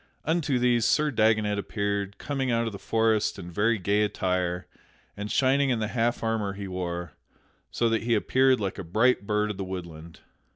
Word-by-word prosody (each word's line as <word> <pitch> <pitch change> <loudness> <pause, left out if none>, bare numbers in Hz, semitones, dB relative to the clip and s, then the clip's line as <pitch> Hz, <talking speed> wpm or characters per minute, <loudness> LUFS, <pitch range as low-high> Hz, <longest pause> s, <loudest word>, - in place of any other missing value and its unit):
Unto 155 -4 +1
these 120 -1 +2
Sir 150 +5 +2
Dagonet 110 -3 +2
appeared, 100 0 -2
coming 135 -2 -2
out 115 -1 +1
of 115 - -3
the 100 - -8
forest 110 -2 +1
in 90 -2 -8
very 110 +6 +2
gay 100 +2 +1
attire, 90 -3 -1 0.5
and 105 +1 -5
shining 135 +1 +3
in 125 - +1
the 110 -1 -2
half 120 0 0
armor 110 -3 -1
he 100 0 -6
wore, 90 -2 -4 0.6
so 120 - 0
that 115 -1 +1
he 115 0 +1
appeared 130 +4 +3
like 100 -1 -3
a - - -4
bright 110 +4 +2
bird 105 0 +1
of 100 - -7
the 95 - -3
woodland. 85 -3 -8
105 Hz, 190 wpm, -27 LUFS, 95-120 Hz, 0.6 s, shining